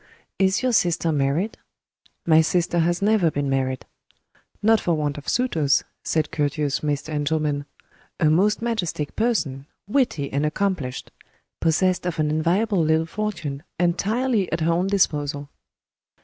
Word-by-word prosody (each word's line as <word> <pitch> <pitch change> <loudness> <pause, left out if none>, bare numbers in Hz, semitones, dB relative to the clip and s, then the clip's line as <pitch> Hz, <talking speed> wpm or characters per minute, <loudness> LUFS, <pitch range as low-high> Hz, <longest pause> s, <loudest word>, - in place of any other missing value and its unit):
"Is 190 +4 +2
your 255 -1 +1
sister 170 -5 +2
married?" 150 +9 0 0.7
"My 160 -1 +6
sister 170 +1 +1
has 175 +3 +1
never 205 -5 +3
been 145 -2 -2
married." 130 -1 -1 0.8
"Not 220 +1 +5
for 170 -3 0
want 150 -2 -2
of 145 - -6
suitors," 165 - +2 0.2
said 155 -2 0
courteous 145 -1 -1
Mr. 150 0 -2
Engelman. 145 -1 -1 0.5
"A - - +2
most 200 +7 +2
majestic 180 -10 -2
person. 160 - -1 0.2
Witty 205 - 0
and 140 +2 0
accomplished. 150 -5 -2 0.5
Possessed 180 +3 +1
of 175 - -3
an 150 -1 +1
enviable 175 +5 +1
little 160 +1 +2
fortune, 165 -7 -4 0.2
entirely 205 +5 +1
at 165 - -1
her 165 +1 +2
own 180 +3 +1
disposal." 145 -7 0
165 Hz, 135 wpm, -23 LUFS, 145-195 Hz, 0.8 s, My